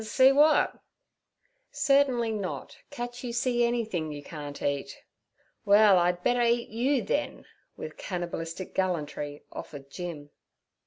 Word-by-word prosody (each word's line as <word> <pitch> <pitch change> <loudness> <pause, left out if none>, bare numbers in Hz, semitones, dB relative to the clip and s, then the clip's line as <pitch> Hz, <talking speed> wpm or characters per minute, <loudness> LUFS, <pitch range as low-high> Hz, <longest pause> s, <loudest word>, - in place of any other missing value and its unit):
'See 260 +4 +5
w'at?' 295 +3 +4 0.9
'Certainly 270 -5 +2
not—catch 240 +4 -6
you 245 - -3
see 240 0 +1
anythin' 220 -10 -1
you 145 -1 -7
can't 145 -2 -8
eat.' 140 -1 -3 0.6
'Well, 205 -2 +6
I'd 175 0 +1
better 245 0 +2
eat 235 0 +2
you, 250 +5 +1
then' - - -2 0.3
with - - -7
cannabalistic 175 -1 -5
gallantry 150 -5 -2
offered 140 -2 -9
Jim. 155 -5 -7
205 Hz, 115 wpm, -28 LUFS, 165-240 Hz, 0.9 s, Well